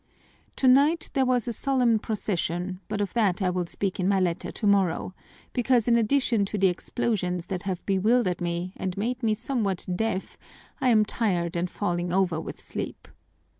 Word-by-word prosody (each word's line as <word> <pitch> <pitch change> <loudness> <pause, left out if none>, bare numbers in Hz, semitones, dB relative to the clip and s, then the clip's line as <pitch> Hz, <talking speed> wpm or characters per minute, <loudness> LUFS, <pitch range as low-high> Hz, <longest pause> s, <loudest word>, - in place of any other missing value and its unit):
"Tonight 280 +5 +4
there 265 -2 +2
was 250 -3 +1
a 235 - -1
solemn 250 -3 +2
procession, 185 -4 -2
but 210 -1 -2
of 200 - -2
that 205 -6 +2
I 185 -2 +1
will 180 -1 -2
speak 195 +2 -2
in 185 - +1
my 195 -1 +3
letter 175 -2 -1
tomorrow, 195 -4 +1 0.4
because 245 -2 +2
in 235 - +5
addition 235 -1 +2
to 210 - -4
the 190 -1 +4
explosions 180 -2 -2
that 185 -2 -4
have 185 -1 -4
bewildered 195 -1 +2
me 175 +1 -2
and 185 -1 -3
made 245 +5 -2
me 220 -2 +2
somewhat 215 -5 -2
deaf 220 -1 -2 0.4
I 255 - +3
am 215 -3 +5
tired 180 -7 -1
and 175 +1 -1
falling 175 -3 -2
over 180 -3 +1
with - - -8
sleep. - - -6
200 Hz, 170 wpm, -26 LUFS, 180-235 Hz, 0.4 s, in